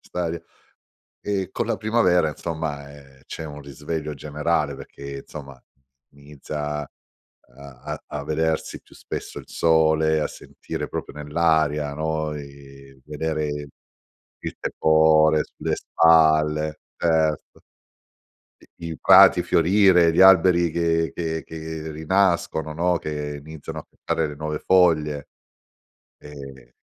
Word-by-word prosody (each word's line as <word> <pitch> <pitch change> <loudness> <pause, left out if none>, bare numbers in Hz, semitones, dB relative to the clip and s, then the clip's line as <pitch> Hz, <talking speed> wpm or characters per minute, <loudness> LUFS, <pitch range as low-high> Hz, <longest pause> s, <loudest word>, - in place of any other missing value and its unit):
st'aria, 85 -1 -4 0.8
ehm, 95 -3 -2
con 120 - -2
la 115 - -1
primavera 95 -7 +2
insomma, 75 -3 -5
ehm, 70 -2 -17
c'è 80 - -7
un 75 -1 -9
risveglio 75 +2 -5
generale 75 0 -2
perché, 70 +1 -9
insomma 70 -4 -11 0.5
inizia 75 +1 -6
a 70 - -9 0.7
a 70 -2 -9
a 75 -1 -6
vedersi 80 +1 -2
più - - -21
spesso - - -7
il - - -12
sole, 80 -1 +2
a - - 0
sentire - - -7
proprio - - -6
nell'aria, 75 -1 0
no, 80 0 -2
i 70 -1 -13
vedere 75 0 -3 1.0
il - - -6
tepore 80 0 +3
sulle - - -4
spalle 80 -1 +3 0.2
certo. 80 -3 0 1.0
I 85 -1 -10
i 80 - -7
prati 95 -2 +7
fiorire, 90 -1 +4
gli - - +4
alberi 90 -2 +6
che 80 -2 0
che 80 -1 -3
che 80 0 -7
rinascono, 80 -1 0
no, 90 +2 +1
che 75 -2 -5
iniziano 80 -1 -8
a - - -10
spuntare 80 -1 -3
le 75 - -8
nuove 75 0 -4
foglie, 75 -6 +2 0.9
ehm 70 -4 -12
80 Hz, 120 wpm, -23 LUFS, 75-80 Hz, 1.0 s, prati